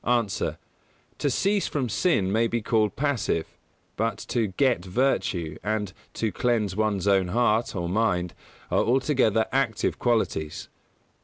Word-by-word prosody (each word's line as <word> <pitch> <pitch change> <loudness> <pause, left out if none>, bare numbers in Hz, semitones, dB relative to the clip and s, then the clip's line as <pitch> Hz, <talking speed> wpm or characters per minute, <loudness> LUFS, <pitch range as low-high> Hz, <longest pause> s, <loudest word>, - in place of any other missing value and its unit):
_ 120 -5 +1
A. - - -6 0.6
To 145 - +1
"cease 200 +9 +1
from 135 -4 -1
sin" 110 - +1
may 115 +3 +2
be 120 - -1
called 110 -2 +1
passive, 130 - 0 0.5
but 110 -1 -1
to 115 -3 +1
"get 120 0 +1
virtue" 90 - 0
and 105 -2 -2 0.2
"to 110 -2 -1
cleanse 110 -6 0
one's 105 -3 0
own 95 -2 +3
heart," 115 +3 +1
or 85 -2 -2
mind, 90 -3 0 0.4
are - - +3
altogether 125 -3 +2
active 130 -6 0
qualities. 110 -10 -1
110 Hz, 140 wpm, -26 LUFS, 95-125 Hz, 0.6 s, own